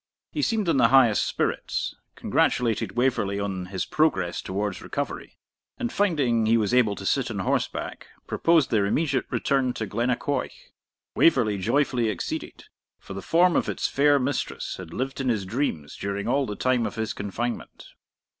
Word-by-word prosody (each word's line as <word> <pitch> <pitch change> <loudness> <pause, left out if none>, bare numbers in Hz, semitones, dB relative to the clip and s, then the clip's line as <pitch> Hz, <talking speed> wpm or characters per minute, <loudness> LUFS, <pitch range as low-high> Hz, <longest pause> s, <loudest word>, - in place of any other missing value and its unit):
He 300 - -2
seemed 220 -7 0
in 165 - +3
the 125 - +6
highest 125 -5 +5
spirits, - - -2 0.2
congratulated 115 -3 +1
Waverley 120 -6 +1
on 95 -3 -3
his 95 0 -3
progress 95 - +1
towards 100 0 -3
recovery, - - -5 0.4
and 240 -2 -3
finding 135 - +2
he 115 +1 +4
was 110 +1 0
able 115 -5 +4
to - - -8
sit - - +1
on - - -4
horseback, - - -2 0.2
proposed 165 -4 +2
their 105 -3 +2
immediate 140 +2 0
return 135 -2 +1
to 110 - -3
Glennaquoich. 125 +6 -2 0.4
Waverley 115 -10 +3
joyfully 120 +2 +1
acceded, 100 -5 -5 0.3
for - - -10
the 95 - -5
form 175 - +3
of - - +1
its - - -1
fair 145 +1 +4
mistress 135 0 -2
had 90 -3 -9
lived 135 +7 -3
in 130 - 0
his 105 -5 0
dreams 95 - -2
during 100 +1 -3
all 135 +2 +1
the 105 - -4
time 125 -2 +1
of 105 - -7
his 110 -1 -2
confinement. 115 +4 -5
120 Hz, 165 wpm, -25 LUFS, 100-140 Hz, 0.4 s, the